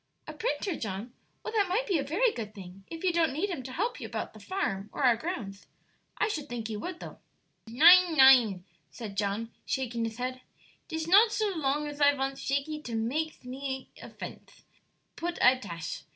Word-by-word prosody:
"A -, -, -6 dB
printer, 425 Hz, -6 st, -2 dB
John? 215 Hz, +3 st, -5 dB, 0.3 s
Well, 445 Hz, -, -5 dB
that 410 Hz, -4 st, +2 dB
might 440 Hz, +7 st, +1 dB
be 380 Hz, -9 st, +1 dB
a -, -, -1 dB
very 385 Hz, -, +2 dB
good 215 Hz, -2 st, -6 dB
thing 190 Hz, 0 st, -11 dB
if 330 Hz, +1 st, -8 dB
you 365 Hz, -2 st, +2 dB
don't 335 Hz, -1 st, +2 dB
need 350 Hz, +9 st, -2 dB
him 335 Hz, -, -4 dB
to 255 Hz, +1 st, -8 dB
help 410 Hz, -, -2 dB
you -, -, -6 dB
about -, -, -5 dB
the -, -, -13 dB
farm, 210 Hz, -, -3 dB
or -, -, -4 dB
our 245 Hz, -3 st, +6 dB
grounds. 225 Hz, -, -6 dB, 0.5 s
I 435 Hz, -, +2 dB
should 310 Hz, -9 st, -4 dB
think 235 Hz, -2 st, -4 dB
you 210 Hz, -, -4 dB
would, 350 Hz, +9 st, -6 dB
though." -, -, -9 dB, 0.5 s
"Nein, 335 Hz, +7 st, +7 dB
nein," 245 Hz, -9 st, +6 dB, 0.2 s
said 215 Hz, -5 st, -8 dB
John, 205 Hz, +3 st, -2 dB
shaking 235 Hz, -3 st, -2 dB
his 225 Hz, 0 st, -5 dB
head; 255 Hz, +1 st, -4 dB, 0.5 s
"'tis 320 Hz, -1 st, -4 dB
not 415 Hz, +6 st, +6 dB
so 430 Hz, -2 st, 0 dB
long 295 Hz, -1 st, 0 dB
as 290 Hz, 0 st, -7 dB
I 285 Hz, 0 st, +6 dB
vants 270 Hz, 0 st, -3 dB
Shakey 285 Hz, +3 st, -2 dB
to 235 Hz, -5 st, -5 dB
makes 275 Hz, +9 st, -2 dB
mit 250 Hz, -, -10 dB
me 265 Hz, 0 st, -5 dB
a -, -, -9 dB
fence; -, -, -10 dB, 0.5 s
put 345 Hz, +1 st, -4 dB
I 255 Hz, +1 st, +5 dB
tash! 170 Hz, -, -6 dB
270 Hz, 205 wpm, -29 LUFS, 230-340 Hz, 0.5 s, Nein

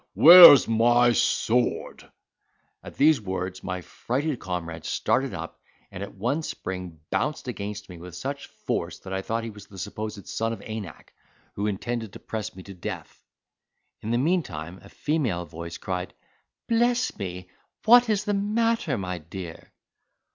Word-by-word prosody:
where's 170 Hz, -4 st, +11 dB
my 120 Hz, +2 st, +4 dB
sword?" 120 Hz, +1 st, 0 dB, 0.7 s
At -, -, -11 dB
these 150 Hz, -3 st, +4 dB
words 95 Hz, -1 st, -4 dB
my 90 Hz, -1 st, -4 dB
frighted 130 Hz, -, -3 dB
comrade 85 Hz, -3 st, -5 dB
started 135 Hz, 0 st, 0 dB
up, 85 Hz, -2 st, -7 dB, 0.3 s
and, 90 Hz, -, -8 dB
at 100 Hz, -, -7 dB
one 125 Hz, +11 st, -1 dB
spring, 90 Hz, -, -6 dB
bounced 150 Hz, -3 st, -1 dB
against 105 Hz, -3 st, -5 dB
me 90 Hz, -2 st, -11 dB
with 90 Hz, +1 st, -10 dB
such 140 Hz, +1 st, -5 dB
force -, -, -4 dB
that 95 Hz, -, -9 dB
I 95 Hz, -, -1 dB
thought 115 Hz, +3 st, -2 dB
he 115 Hz, -, -5 dB
was 105 Hz, -1 st, -13 dB
the 100 Hz, -, -14 dB
supposed 105 Hz, +2 st, -6 dB
son 115 Hz, +1 st, -2 dB
of 105 Hz, -, -8 dB
Anak, 110 Hz, -7 st, -8 dB, 0.4 s
who 100 Hz, +1 st, -2 dB
intended 110 Hz, +1 st, -3 dB
to -, -, -9 dB
press 110 Hz, -5 st, -5 dB
me 95 Hz, -, -10 dB
to 100 Hz, -, -10 dB
death. 90 Hz, -, -7 dB, 0.8 s
In 110 Hz, -, -5 dB
the 120 Hz, -, +1 dB
meantime 110 Hz, -, -1 dB
a 100 Hz, -, -15 dB
female 125 Hz, -, -1 dB
voice 85 Hz, +1 st, -8 dB
cried, 90 Hz, -1 st, -4 dB, 0.5 s
"Bless 240 Hz, +2 st, +1 dB
me! 90 Hz, -2 st, -6 dB, 0.3 s
what 240 Hz, +1 st, +7 dB
is 215 Hz, -1 st, +1 dB
the 205 Hz, -, 0 dB
matter, 210 Hz, -, 0 dB
my 90 Hz, -2 st, -4 dB
dear?" 85 Hz, +1 st, -9 dB
105 Hz, 155 wpm, -25 LUFS, 90-140 Hz, 0.8 s, where's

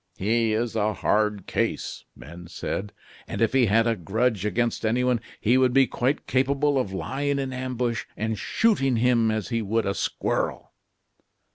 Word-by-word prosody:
"He 115 Hz, +3 st, +1 dB
is 115 Hz, +1 st, -1 dB
a 110 Hz, -1 st, +1 dB
hard 105 Hz, -2 st, 0 dB
case," -, -, -2 dB
men 85 Hz, +3 st, -11 dB
said; 100 Hz, +3 st, -4 dB, 0.4 s
"and -, -, -5 dB
if 115 Hz, +1 st, +2 dB
he 130 Hz, -3 st, +4 dB
had 115 Hz, +3 st, +3 dB
a 115 Hz, -1 st, +2 dB
grudge 105 Hz, +2 st, 0 dB
against 120 Hz, +2 st, -1 dB
anyone, 125 Hz, +2 st, +1 dB, 0.2 s
he 120 Hz, +4 st, +3 dB
would 130 Hz, -1 st, +3 dB
be 135 Hz, 0 st, +6 dB
quite 130 Hz, +3 st, -1 dB
capable 140 Hz, +2 st, +1 dB
of 105 Hz, -7 st, -2 dB
lying 140 Hz, +8 st, -2 dB
in 135 Hz, -1 st, -3 dB
ambush 125 Hz, -2 st, -2 dB
and 110 Hz, +1 st, -1 dB
shooting 135 Hz, -, +1 dB
him 115 Hz, -1 st, +3 dB
as 110 Hz, -2 st, -2 dB
he 115 Hz, -2 st, 0 dB
would 110 Hz, +2 st, 0 dB
a 100 Hz, -, 0 dB
squirrel." -, -, -2 dB
115 Hz, 165 wpm, -25 LUFS, 105-130 Hz, 0.4 s, be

